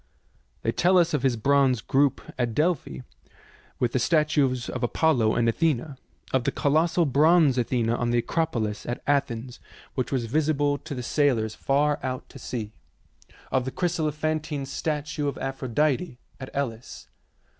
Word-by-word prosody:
They -, -, +1 dB
tell 185 Hz, +2 st, +3 dB
us 170 Hz, -2 st, +3 dB
of 150 Hz, -, +1 dB
his 130 Hz, -2 st, +2 dB
bronze 135 Hz, +1 st, +3 dB
group 135 Hz, +4 st, +1 dB
at 120 Hz, -3 st, -2 dB
Delphi, 150 Hz, -, 0 dB, 0.8 s
with 120 Hz, -2 st, 0 dB
the 130 Hz, -, +1 dB
statues 145 Hz, -4 st, +2 dB
of 125 Hz, -, -4 dB
Apollo 120 Hz, -3 st, +2 dB
and 115 Hz, -, +2 dB
Athena; 145 Hz, +2 st, 0 dB, 0.4 s
of 130 Hz, -2 st, +2 dB
the -, -, 0 dB
colossal 160 Hz, +3 st, +2 dB
bronze 150 Hz, +1 st, +4 dB
Athena 120 Hz, -1 st, 0 dB
on 120 Hz, 0 st, -1 dB
the 120 Hz, -, +2 dB
Acropolis 115 Hz, -6 st, -1 dB
at 120 Hz, -, -4 dB
Athens, 125 Hz, -4 st, -1 dB, 0.3 s
which 130 Hz, -, -2 dB
was 130 Hz, -4 st, 0 dB
visible 145 Hz, +2 st, +1 dB
to 155 Hz, -3 st, -7 dB
the 125 Hz, -, -5 dB
sailors 120 Hz, -6 st, +1 dB
far 145 Hz, +4 st, +1 dB
out 130 Hz, -1 st, -4 dB
to 135 Hz, -, -12 dB
sea; 115 Hz, -3 st, -5 dB, 0.8 s
of 130 Hz, -, +2 dB
the 130 Hz, -, -4 dB
chryselephantine 155 Hz, -3 st, -1 dB
statue 150 Hz, +1 st, -3 dB
of 140 Hz, -, -3 dB
Aphrodite 135 Hz, +3 st, -1 dB, 0.2 s
at 130 Hz, -, -7 dB
Elis. 125 Hz, -4 st, -5 dB
140 Hz, 150 wpm, -26 LUFS, 120-155 Hz, 0.8 s, bronze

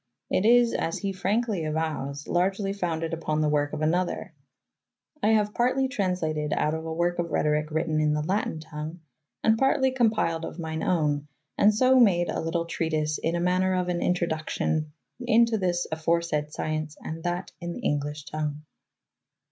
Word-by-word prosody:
It 195 Hz, -, +2 dB
is, 240 Hz, 0 st, +5 dB
as 165 Hz, -, -1 dB
he 200 Hz, -2 st, -3 dB
frankly 200 Hz, 0 st, 0 dB
avows, 155 Hz, -2 st, -3 dB
largely 195 Hz, +3 st, 0 dB
founded 165 Hz, -4 st, -2 dB
upon 155 Hz, -2 st, -1 dB
the 155 Hz, -, +2 dB
work 145 Hz, -1 st, +1 dB
of 155 Hz, 0 st, -3 dB
another. 175 Hz, +3 st, 0 dB, 0.9 s
"I 220 Hz, +1 st, +4 dB
haue 210 Hz, -1 st, +4 dB
partely 255 Hz, +4 st, +1 dB
traunslatyd 175 Hz, -, -1 dB
out 150 Hz, -, +1 dB
of 160 Hz, 0 st, -3 dB
a 165 Hz, -, -5 dB
_ 160 Hz, -, -3 dB
werke 175 Hz, 0 st, +1 dB
of 170 Hz, -, 0 dB
Rhetoryke 150 Hz, 0 st, +1 dB
wrytten 160 Hz, 0 st, 0 dB
in 150 Hz, 0 st, +2 dB
the 150 Hz, -, -1 dB
lattyn 185 Hz, -2 st, -1 dB
tongue, 155 Hz, +2 st, -7 dB, 0.4 s
and 220 Hz, 0 st, +4 dB
partely 270 Hz, 0 st, +3 dB
compyled 215 Hz, -9 st, +1 dB
of 165 Hz, -, -6 dB
m3'ne 160 Hz, -2 st, -4 dB
owne, 150 Hz, -4 st, +1 dB, 0.3 s
and 210 Hz, -, +5 dB
so 255 Hz, +4 st, +4 dB
made 175 Hz, -7 st, +4 dB
a -, -, -1 dB
lytle 165 Hz, +1 st, -1 dB
treatise 155 Hz, -2 st, -1 dB
in 165 Hz, +1 st, -1 dB
maner 185 Hz, +1 st, +2 dB
of 180 Hz, -1 st, 0 dB
an 175 Hz, -1 st, 0 dB
introduccyon 160 Hz, -3 st, 0 dB, 0.3 s
into 230 Hz, 0 st, +3 dB
this 175 Hz, -2 st, 0 dB
aforesaid 160 Hz, -1 st, 0 dB
scyence 155 Hz, 0 st, -3 dB
and 160 Hz, +1 st, -5 dB
that 175 Hz, +1 st, -2 dB
in 175 Hz, 0 st, -4 dB
the -, -, -7 dB
englysshe 145 Hz, +1 st, -2 dB
tongue."' 150 Hz, -1 st, -3 dB
170 Hz, 170 wpm, -26 LUFS, 155-190 Hz, 0.9 s, is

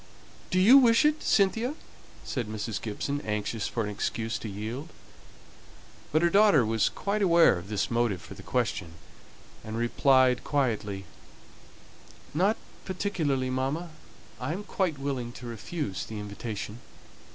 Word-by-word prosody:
"Do 185 Hz, -, +2 dB
you 235 Hz, +9 st, +9 dB
wish 235 Hz, +1 st, +5 dB
it, 305 Hz, +1 st, +2 dB
Cynthia?" 225 Hz, +7 st, +2 dB, 0.5 s
said 120 Hz, -5 st, -3 dB
Mrs. 110 Hz, 0 st, -4 dB
Gibson, 140 Hz, +6 st, -3 dB
anxious 105 Hz, +1 st, -2 dB
for 115 Hz, -, -2 dB
an 105 Hz, -, -3 dB
excuse 110 Hz, +2 st, -2 dB
to 110 Hz, -, -6 dB
yield. 110 Hz, -, -5 dB, 1.2 s
But 155 Hz, +3 st, +3 dB
her 170 Hz, -, +5 dB
daughter 200 Hz, -, +6 dB
was 110 Hz, 0 st, +2 dB
quite 205 Hz, +1 st, -2 dB
aware 170 Hz, -, +6 dB
of 90 Hz, +3 st, -11 dB
this 105 Hz, +1 st, -1 dB
motive 115 Hz, -5 st, +1 dB
for 80 Hz, +3 st, -11 dB
the 100 Hz, -, -11 dB
question, 100 Hz, -7 st, -2 dB, 0.7 s
and 110 Hz, +1 st, -5 dB
replied 130 Hz, +1 st, +3 dB
quietly, 110 Hz, -8 st, -1 dB, 1.3 s
"Not 195 Hz, +8 st, +2 dB, 0.3 s
particularly, 155 Hz, -9 st, -1 dB
mamma. 140 Hz, +7 st, -2 dB, 0.5 s
I 130 Hz, +5 st, -2 dB
am 195 Hz, +4 st, -5 dB
quite 185 Hz, -6 st, -1 dB
willing 135 Hz, -4 st, -3 dB
to 125 Hz, -, -10 dB
refuse 115 Hz, -, -4 dB
the 110 Hz, -, -7 dB
invitation." 105 Hz, +1 st, -6 dB
125 Hz, 140 wpm, -28 LUFS, 110-170 Hz, 1.3 s, you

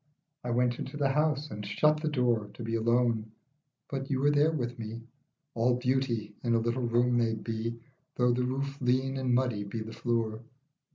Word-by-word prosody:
I 125 Hz, -, -3 dB
went 120 Hz, 0 st, +1 dB
into 135 Hz, +3 st, -5 dB
the 140 Hz, -2 st, +2 dB
house, 150 Hz, 0 st, +1 dB
and 105 Hz, 0 st, -5 dB
shut 150 Hz, +10 st, +2 dB
the 155 Hz, -, -1 dB
door 120 Hz, -7 st, +1 dB
To -, -, -7 dB
be 115 Hz, 0 st, -3 dB
alone, 115 Hz, -1 st, +2 dB, 0.6 s
but 135 Hz, -1 st, -4 dB
you 135 Hz, -2 st, 0 dB
were 145 Hz, +2 st, +4 dB
there 145 Hz, +2 st, +4 dB
with 125 Hz, -6 st, -3 dB
me; 115 Hz, +1 st, -6 dB, 0.5 s
All 120 Hz, +2 st, +2 dB
beauty 125 Hz, -4 st, 0 dB
in 120 Hz, -1 st, +2 dB
a -, -, +4 dB
little 120 Hz, +2 st, 0 dB
room 120 Hz, +1 st, +3 dB
may 115 Hz, -1 st, +2 dB
be, 115 Hz, +1 st, -4 dB, 0.4 s
Though 125 Hz, -1 st, +3 dB
the 125 Hz, +1 st, +1 dB
roof 135 Hz, +2 st, -3 dB
lean 130 Hz, +2 st, +1 dB
and 130 Hz, -2 st, +1 dB
muddy 120 Hz, -5 st, +1 dB
be 105 Hz, +3 st, -5 dB
the 110 Hz, -, -8 dB
floor. 115 Hz, -2 st, -1 dB
120 Hz, 190 wpm, -30 LUFS, 115-135 Hz, 0.6 s, were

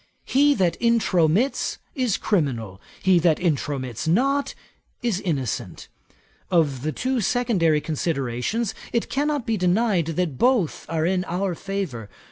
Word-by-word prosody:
He 285 Hz, +2 st, +4 dB
that 180 Hz, -5 st, +1 dB
intromits, 220 Hz, -, +2 dB, 0.2 s
is 250 Hz, -, 0 dB
criminal; 120 Hz, -, -1 dB, 0.2 s
he 185 Hz, -2 st, +5 dB
that 165 Hz, -2 st, +3 dB
intromits 140 Hz, -, -2 dB
not, 275 Hz, -, +1 dB, 0.5 s
is 225 Hz, -6 st, 0 dB
innocent. 130 Hz, -, -3 dB, 0.6 s
Of 150 Hz, -7 st, +2 dB
the 155 Hz, +3 st, -1 dB
two 255 Hz, -, -1 dB
secondary 190 Hz, -9 st, +2 dB
considerations 155 Hz, -, -2 dB, 0.2 s
it 235 Hz, -, -1 dB
cannot 290 Hz, -2 st, 0 dB
be 225 Hz, -1 st, 0 dB
denied 185 Hz, -1 st, +2 dB
that 165 Hz, -8 st, -1 dB
both 245 Hz, -, +1 dB
are 160 Hz, -1 st, 0 dB
in 180 Hz, +1 st, +1 dB
our 185 Hz, +2 st, -1 dB
favour. 170 Hz, -, -4 dB
180 Hz, 125 wpm, -23 LUFS, 150-230 Hz, 0.6 s, he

